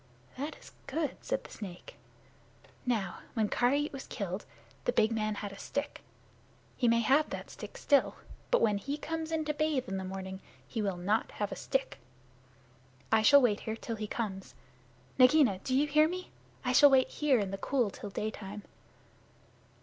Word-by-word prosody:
"That 290 +4 -4
is - - -15 0.2
good," 300 +1 -1
said - - -1
the - - -13
snake. 185 -5 -9 0.9
"Now, 210 -7 -1 0.2
when 220 -3 +1
Karait 285 +5 +1
was 270 - -7
killed, 195 -2 -4 0.4
the - - +3
big 220 - +3
man 215 -1 0
had 205 0 -5
a 195 - -11
stick. 285 +1 -4 0.7
He 245 - +1
may 230 0 +4
have 275 +6 +3
that - - -6
stick - - -9
still, 285 -2 +3 0.3
but - - +3
when 205 -2 +3
he 280 +7 -3
comes 320 +1 -4
in 315 -1 0
to 300 - 0
bathe 295 -4 0
in 195 - -3
the 190 - -3
morning 190 0 -6 0.3
he 225 - -3
will 195 -3 -1
not 205 +5 0
have 205 -1 -3
a - - -3
stick. 265 - -2 1.1
I 220 0 +5
shall 280 +4 +7
wait 210 -4 +3
here 220 - -4
till 230 0 -5
he 215 0 -4
comes. 190 - -4 0.6
Nagaina 255 -6 +6
do 255 +5 -1
you 290 - +4
hear 305 +1 +4
me? 365 +1 -6 0.3
I 250 - +1
shall 285 +3 +8
wait 265 -1 +4
here 295 -4 +2
in 200 -3 -1
the 195 - -4
cool 245 -5 +1
till 210 -2 -7
daytime." 210 0 -5
235 Hz, 180 wpm, -31 LUFS, 205-285 Hz, 1.1 s, shall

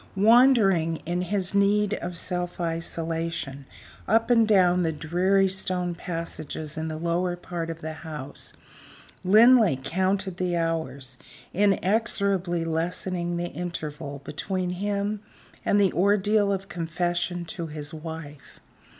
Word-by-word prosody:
Wandering, 205 -7 +5
in 175 +2 -1
his 185 0 -1
need 205 +1 +3
of 175 -4 -4
self 180 0 -3
isolation, 165 -4 -3 0.4
up 225 +3 +3
and 230 -2 +5
down 180 -4 +4
the 165 -2 +1
dreary 180 +6 +2
stone 185 -2 -1
passages 165 -3 -5
in 160 0 -3
the 155 -1 -4
lower 170 +2 0
part 175 -1 -5
of 165 0 -6
the 160 0 -5
house, 150 -3 -8 0.7
Linley 215 - +6
counted 190 +5 0
the 180 -2 -1
hours, 160 -6 -3 0.3
inexorably 195 -3 +1
lessening 175 +1 -1
the 175 0 -2
interval 150 -5 -6
between 185 +3 -3
him 205 +2 -2 0.4
and 205 - +3
the 195 -3 +3
ordeal 205 +2 +3
of 195 0 -2
confession 175 0 -2
to 165 0 -5
his 150 0 -7
wife. 155 -2 -9
175 Hz, 125 wpm, -26 LUFS, 165-195 Hz, 0.7 s, Linley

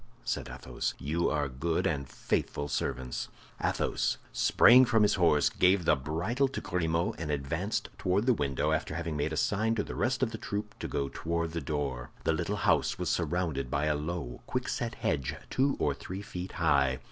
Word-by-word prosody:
said - - -2
Athos. 60 -1 -4
"You 80 +5 0
are 75 -2 0
good 70 +6 -1
and 70 -5 -1
faithful 75 +3 -2
servants." 65 -3 -2 0.4
Athos - - 0 0.2
sprang 125 +2 +7
from 115 -3 +4
his 105 - +4
horse, 85 -6 +4
gave 90 -1 +3
the - - +5
bridle 85 - 0
to 135 - -5
Grimaud, 85 +3 0
and 80 -2 -4
advanced 75 +8 -2
toward 95 +4 +1
the 125 - +5
window, 70 - 0
after 75 - -1
having 85 -1 -3
made 75 +2 -1
a 80 - -3
sign 115 -1 +1
to 105 - 0
the - - -7
rest 130 +2 0
of 115 - +1
the 110 - -6
troop 105 +1 -4
to - - -3
go 70 -1 -1
toward 85 0 -2
the 85 0 -3
door. 70 -5 -3
The - - +2
little - - -1
house - - +2
was - - -1
surrounded 80 -8 -1
by 70 +3 0
a 75 -1 +2
low, 75 -5 -4
quickset - - -2
hedge, 70 - -1 0.2
two 135 +1 +2
or 75 - +1
three 95 +7 -7
feet 90 -2 -6
high. 70 -6 +3
85 Hz, 190 wpm, -30 LUFS, 70-100 Hz, 0.4 s, sprang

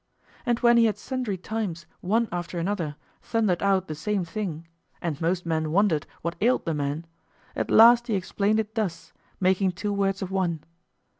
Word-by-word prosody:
And 240 -1 +3
when 235 0 +6
he 230 - +6
had 215 - +1
sundry 250 -7 -3
times, 185 -4 -4
one 225 +5 +1
after 175 0 -4
another, 170 -4 -2 0.3
thundered 215 -7 0
out 195 -2 +2
the 155 - -4
same 185 +5 -1
thing, 165 -3 -5 0.3
and 165 -4 -3
most 175 +2 0
men 160 -2 0
wondered 175 -4 +2 0.2
what 170 +1 -2
ailed 245 +4 +2
the 165 - 0
man, 145 +2 -2 0.5
at - - -2
last 235 +2 +7
he 220 - 0
explained 200 +3 0
it 220 0 -3
thus, 210 -7 -3 0.3
making 190 0 +2
two 205 +3 -3
words 195 -1 0
of 190 - -5
one. 175 -5 -1
190 Hz, 175 wpm, -26 LUFS, 170-215 Hz, 0.5 s, last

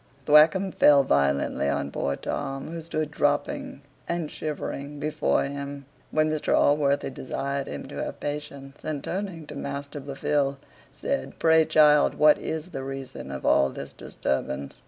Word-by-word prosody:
Thwackum 155 +6 +5
fell 145 -4 +6
violently 70 - +1
on 70 0 -1
poor 70 - -1
Tom, 135 +3 -4
who 165 0 -5
stood 155 -2 -3
dropping 145 -1 -1 0.3
and 170 -3 -2
shivering 145 -1 -5
before 155 +1 +1
him, 140 0 -5 0.2
when 155 0 +2
Mr 155 -1 +1
Allworthy 145 -1 +2
desired 140 +1 -3
him 70 - -6
to - - -5
have - - -7
patience; 145 -1 -6
and 150 -3 -3
turning 185 -4 -4
to - - -9
Master 140 +1 -5
Blifil, 140 0 -1 0.3
said, - - -3
"Pray, 160 -1 +5
child, 150 -2 +5
what 150 0 +5
is 160 +2 -4
the 135 - -4
reason 135 - -7
of 65 -1 -6
all 70 - +4
this - - -8
disturbance?" 65 +1 -3
145 Hz, 150 wpm, -26 LUFS, 135-155 Hz, 0.3 s, fell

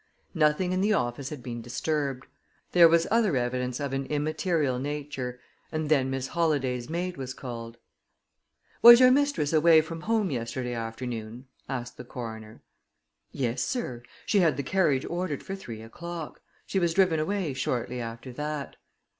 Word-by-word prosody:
Nothing 160 +2 +2
in 185 0 +1
the 210 +2 +3
office 125 - -1
had 145 -5 -8
been 120 -1 -5
disturbed. 135 +2 -2 0.5
There 175 -1 +8
was 165 0 +4
other 215 - +3
evidence 125 +1 -1
of 140 -2 -3
an 135 0 -2
immaterial 150 -2 0
nature, 140 -3 -4 0.3
and 155 -1 -2
then 135 -4 +3
Miss 135 0 -3
Holladay's 135 -7 0
maid 175 +1 -3
was 130 -1 -5
called. 115 -2 -7 1.0
"Was 235 0 +11
your 255 0 +7
mistress 280 - +2
away 160 +1 +6
from 165 +1 -7
home 215 -2 +1
yesterday 125 0 -3
afternoon?" 115 +1 -5 0.2
asked 125 -3 -4
the - - -7
coroner. 110 -3 -8 0.7
"Yes, 125 -4 -1
sir; 130 - -3 0.2
she 205 - +3
had 170 -4 +3
the 140 - -2
carriage 150 -4 +2
ordered 175 -5 -3
for 195 - -5
three 115 - -8
o'clock. 170 +7 -7 0.2
She 195 - 0
was 170 -2 +1
driven 185 -5 +4
away 180 -2 -1
shortly 125 -1 -2
after 115 +2 -7
that." 150 +1 -4
145 Hz, 155 wpm, -27 LUFS, 125-170 Hz, 1.0 s, Was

